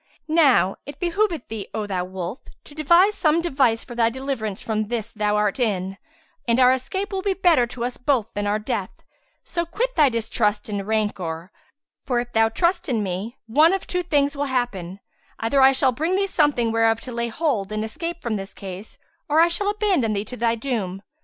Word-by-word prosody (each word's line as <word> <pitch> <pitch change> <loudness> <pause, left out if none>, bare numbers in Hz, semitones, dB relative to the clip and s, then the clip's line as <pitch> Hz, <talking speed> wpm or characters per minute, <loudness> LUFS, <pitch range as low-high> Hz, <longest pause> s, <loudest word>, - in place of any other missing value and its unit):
Now 295 - +4
it 285 - -9
behoveth 355 - 0
thee, 215 -3 -6
O 215 -1 -2
thou 185 -3 -2
wolf, 185 +4 -5 0.2
to - - -14
devise 340 +7 +4
some 320 -4 +2
device 265 -9 +1
for 245 - -10
thy 230 -1 +2
deliverance 240 -5 -4
from 215 -1 -2
this 230 -1 -3
thou 210 -1 0
art 210 +2 +1
in, 195 -5 -1 0.5
and 235 +1 +3
our 250 0 +7
escape 375 +11 -2
will 380 - -1
be 390 0 0
better 335 -10 +4
to 235 0 -4
us 245 - -4
both 250 -3 +1
than 205 0 -2
our 205 +1 +1
death: 215 - -3 0.5
so 340 -1 -2
quit 485 +9 -2
thy 300 -4 +5
distrust 220 -2 -1
and 200 -1 -3
rancour; 190 -5 -2 0.5
for 245 -3 0
if 240 0 -5
thou 225 0 +4
trust 345 +7 0
in 225 -4 +1
me 195 +6 -4
one 300 +10 +4
of 385 - -2
two 360 - -1
things 290 -4 +1
will 285 +1 -1
happen; 210 -9 -2 0.4
either 270 +5 +1
I 265 0 +8
shall 265 0 +3
bring 320 +9 -1
thee 395 +1 +2
something 295 -11 +2
whereof 225 0 +2
to 255 - -8
lay 235 0 -2
hold 230 - -1
and 215 +1 -2
escape 335 +9 -5
from 225 -3 -1
this 195 0 -8
case, 195 +1 -8 0.3
or 300 +2 +4
I 335 +1 +6
shall 400 +4 0
abandon 390 - +1
thee 200 +1 -2
to 250 - -7
thy 230 -1 +1
doom. 215 -6 -3
240 Hz, 205 wpm, -23 LUFS, 215-310 Hz, 0.5 s, I